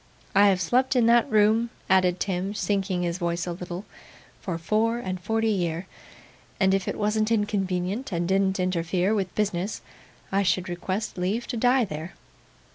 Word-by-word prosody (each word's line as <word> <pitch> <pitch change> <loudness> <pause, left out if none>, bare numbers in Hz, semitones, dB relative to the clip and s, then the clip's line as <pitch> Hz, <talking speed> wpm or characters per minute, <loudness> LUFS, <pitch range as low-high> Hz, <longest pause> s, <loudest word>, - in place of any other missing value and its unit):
I 200 +1 +6
have 190 -2 +3
slept 250 +9 +1
in 245 -2 +4
that 235 0 +4
room,' 220 +2 +3 0.2
added 185 -1 +3
Tim, 190 +1 -2
sinking 195 -3 -1
his 175 +1 -2
voice 170 -1 -1
a 175 - -3
little, 180 +2 -6 0.5
'for 180 -5 -4
four 215 +7 +1
and 185 -6 -4
forty 225 +2 0
year; 175 -3 -1 0.7
and 190 -1 +4
if 195 -1 0
it - - -2
wasn't 215 +1 +1
inconvenient, 205 +1 -1
and 170 -1 -1
didn't 190 0 +1
interfere 180 +2 0
with 195 -4 -2
business, 200 -1 -1 0.5
I 195 +1 +2
should 185 0 0
request 185 +3 -3
leave 200 +7 -1
to 245 - -2
die 245 +1 +3
there. 160 0 -7
195 Hz, 165 wpm, -26 LUFS, 180-215 Hz, 0.7 s, I